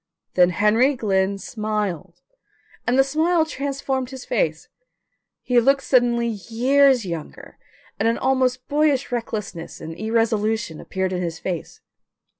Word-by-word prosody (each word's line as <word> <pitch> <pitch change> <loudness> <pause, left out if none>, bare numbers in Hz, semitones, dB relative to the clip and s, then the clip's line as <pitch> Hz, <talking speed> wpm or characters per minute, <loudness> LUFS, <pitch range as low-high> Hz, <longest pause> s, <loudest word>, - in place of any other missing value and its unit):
Then 180 -1 +5
Henry 220 - +3
Glynn 195 -4 0
smiled 200 -5 -4 0.6
and 245 +1 +2
the 270 - +6
smile 315 +4 +2
transformed 275 -3 -3
his 260 -2 -9
face. - - -1 0.8
He 245 -1 +3
looked 270 +3 +3
suddenly 240 -2 +2
years 245 +4 +2
younger, 170 -4 -7 0.4
and 225 - +2
an 230 - +1
almost 255 -1 0
boyish 290 -3 +1
recklessness 210 -8 -5
and 165 0 -7
irresolution 220 -2 -1
appeared 190 0 -2
in 180 - -2
his 165 -2 -3
face. 175 -2 -5
230 Hz, 125 wpm, -22 LUFS, 195-265 Hz, 0.8 s, the